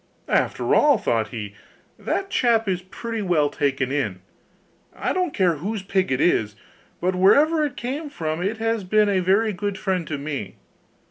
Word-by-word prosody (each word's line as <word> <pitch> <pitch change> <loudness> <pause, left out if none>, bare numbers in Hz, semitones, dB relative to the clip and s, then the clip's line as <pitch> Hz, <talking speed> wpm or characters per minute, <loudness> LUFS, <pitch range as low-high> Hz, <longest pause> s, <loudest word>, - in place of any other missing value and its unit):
'After - - +1
all,' 290 -4 +5
thought 115 - 0
he, 105 -2 -7 0.5
'that 390 0 -2
chap 230 -3 +2
is 185 -2 0
pretty 225 +4 -5
well 160 -7 +1
taken 135 -2 -1
in. 105 -11 -2 0.7
I - - -1
don't 365 -3 0
care 180 - +1
whose 200 +5 -4
pig 190 -3 0
it 130 - +1
is, 110 -11 +2 0.4
but 185 +2 0
wherever 295 - +4
it 290 -3 -3
came 280 +6 -4
from 160 - -3
it 200 +5 -1
has 225 -1 -1
been 210 +2 +3
a 195 -2 +2
very 200 +4 +2
good 200 +1 -3
friend 185 -4 -2
to 150 - -3
me. 140 -9 -5
190 Hz, 175 wpm, -23 LUFS, 150-225 Hz, 0.7 s, all